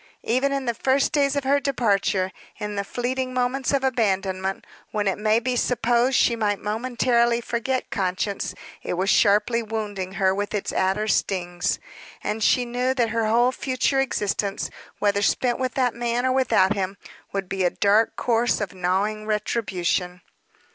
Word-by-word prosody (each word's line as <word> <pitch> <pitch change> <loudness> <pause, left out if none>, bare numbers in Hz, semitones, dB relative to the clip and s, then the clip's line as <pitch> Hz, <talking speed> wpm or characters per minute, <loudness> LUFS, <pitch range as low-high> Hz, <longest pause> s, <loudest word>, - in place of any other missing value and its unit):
Even 260 +4 +1
in 275 -1 -2
the 235 - 0
first 270 +4 +1
days 280 -1 +2
of 285 - 0
her 280 +2 +3
departure, 205 -8 +1 0.3
in 210 0 -4
the 200 - -1
fleeting 255 +4 -3
moments 255 +2 0
of 275 -1 +1
abandonment, 195 -6 0 0.2
when 210 -1 -1
it 195 - 0
may 215 +1 +3
be 250 +1 -1
supposed 245 +1 +2
she 235 - +3
might 210 -3 0
momentarily 235 +1 +1
forget 240 +2 -2
conscience, 185 0 -2 0.3
it - - -3
was 190 +3 +1
sharply 210 +3 +3
wounding 210 -4 -4
her 190 -1 +2
with 205 +2 -3
its 205 - -2
adder 195 +3 +1
stings; 175 -4 0 0.5
and 220 +1 -2
she 250 +3 +3
knew 250 +2 -1
that 240 -3 +1
her 225 0 0
whole 240 +3 +3
future 260 +1 0
existence, 205 -6 -1 0.3
whether 200 -1 +1
spent 240 +3 +1
with 255 -1 -2
that 250 -3 +2
man 240 +1 -1
or 260 - +2
without 255 -7 +3
him, 195 -1 -3 0.3
would 195 -1 -3
be 190 0 -2
a 180 - +4
dark 205 +5 +2
course 235 0 +1
of 205 -3 -4
gnawing 195 +4 -1
retribution. 190 -4 -1
220 Hz, 165 wpm, -24 LUFS, 195-250 Hz, 0.5 s, a